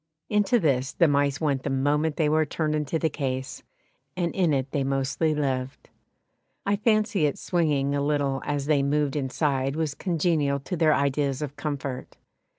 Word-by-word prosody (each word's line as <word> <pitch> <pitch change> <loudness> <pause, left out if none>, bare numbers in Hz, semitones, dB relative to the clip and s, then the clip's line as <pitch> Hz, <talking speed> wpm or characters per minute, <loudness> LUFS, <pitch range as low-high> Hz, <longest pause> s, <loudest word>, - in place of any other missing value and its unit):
Into 210 +3 +3
this 135 -6 +1
the 170 - +4
mice 145 -1 +1
went 145 -4 0
the 140 - -3
moment 145 +3 +1
they 155 - +1
were 155 +1 +3
turned 155 0 -2
into 150 +1 -1
the 160 - +1
case, 130 -3 -4 0.6
and 170 -2 -1
in 180 -4 +2
it 135 -1 -1
they 140 - 0
mostly 135 +3 0
lived. 130 -3 -3 0.8
I 200 - +2
fancy 215 -6 +2
its 145 - -4
swinging 145 -6 +1
a 140 - 0
little 140 -2 0
as 145 -1 -2
they 145 -2 +3
moved 145 0 0
inside 135 -1 0
was 155 -3 -1
congenial 155 -5 0
to 160 +7 -4
their 155 -2 +3
ideas 140 0 0
of 145 -1 -6
comfort. 140 -4 -5
145 Hz, 170 wpm, -26 LUFS, 135-160 Hz, 0.8 s, the